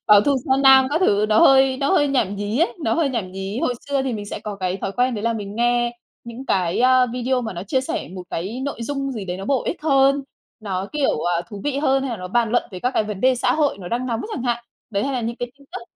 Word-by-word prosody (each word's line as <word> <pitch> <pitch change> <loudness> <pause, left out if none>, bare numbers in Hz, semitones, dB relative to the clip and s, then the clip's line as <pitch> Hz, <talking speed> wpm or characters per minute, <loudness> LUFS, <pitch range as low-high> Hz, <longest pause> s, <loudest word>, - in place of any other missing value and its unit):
báo 210 -1 +8
thù 280 +5 +2
tra 265 - +2
nam 265 -1 +7
các 315 - +1
thứ, 210 - +3
nó 215 - +4
hơi 265 -1 +6
nó 275 +1 0
hơi 290 -6 +3
nhảm 210 -8 0
nhí 205 +5 -2
ấy, 335 - +2
nó - - +2
hơi 325 -4 +1
nhảm 215 -8 -3
nhí. 195 +4 -4
Hồi 250 - 0
xưa 275 -1 +1
thì 260 -2 -2
mình 205 -2 -5
sẽ - - -6
có 205 -2 -6
cái 185 -1 -2
thói 195 - -4
quen 250 +1 +1
đấy 210 - -4
là 230 0 +1
mình 205 -2 -6
nghe 240 0 +1 0.3
những 235 +3 -9
cái, 180 +1 +1
a, 255 0 +5
video 250 +1 -1
mà 220 -3 -4
nó 175 0 -6
chia 260 +6 0
sẻ 325 +5 -4
một 185 - -6
cái 205 +10 -4
nội 280 -4 -4
dung 275 +1 -3
gì 215 -5 -5
đấy 180 0 -4
nó 195 - -7
bổ 265 +2 +1
ích 300 - -4
hơn, 275 -1 +3 0.4
nó 195 -2 -3
kiểu, 285 - 0 0.2
à, 170 - -2
thú 205 -1 -8
vị 280 -1 -1
hơn 270 -2 +2
hay 270 - -3
là 230 - -3
nó 180 -1 -7
bàn 235 +1 +1
luận 245 - +2
về 185 - -7
các 250 - 0
cái 215 - +2
vấn 210 -2 -5
đề 260 0 +4
xã 250 +1 +1
hội 290 -8 +1
nó 175 -2 -7
đang 245 +2 -2
nóng 230 -2 -2
chẳng 250 - -4
hạn, 240 -1 -1 0.3
đấy, 200 -1 -1
hay 275 - -1
là 250 - -1
những 235 +1 -3
cái 245 0 -5
tin 280 - -20
tức, - - -6
240 Hz, 295 wpm, -21 LUFS, 205-270 Hz, 0.4 s, báo